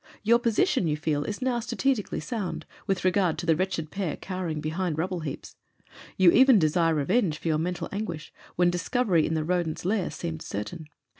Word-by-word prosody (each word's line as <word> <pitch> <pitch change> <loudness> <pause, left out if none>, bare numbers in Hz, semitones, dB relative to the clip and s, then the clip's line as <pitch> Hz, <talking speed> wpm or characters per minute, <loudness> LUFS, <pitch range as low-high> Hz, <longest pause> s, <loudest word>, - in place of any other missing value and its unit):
Your 235 +3 +5
position, 245 - +2
you 150 -1 0
feel, 150 -1 -1
is 210 +4 -4
now 250 -2 +1
strategically 235 -4 -1
sound, 200 +3 -4 0.2
with 195 -2 -1
regard 185 -3 +2
to 170 - -4
the 165 -2 +4
wretched 170 -3 -2
pair 190 -6 -2
cowering 180 -5 -4
behind 160 +2 -2
rubble 180 +2 -1
heaps. 150 -4 -7 0.6
You 185 -2 +7
even 260 +2 +7
desire 165 -1 +2
revenge 165 - +1
for 165 - -3
your 155 -1 +2
mental 175 +2 -2
anguish 175 -7 -5 0.2
when 175 0 +3
discovery 175 -1 +1
in 160 - -1
the 155 - 0
rodent's 170 -1 -1
lair 195 -1 0
seemed 165 -2 -5
certain. 105 - -6
175 Hz, 180 wpm, -27 LUFS, 160-205 Hz, 0.6 s, You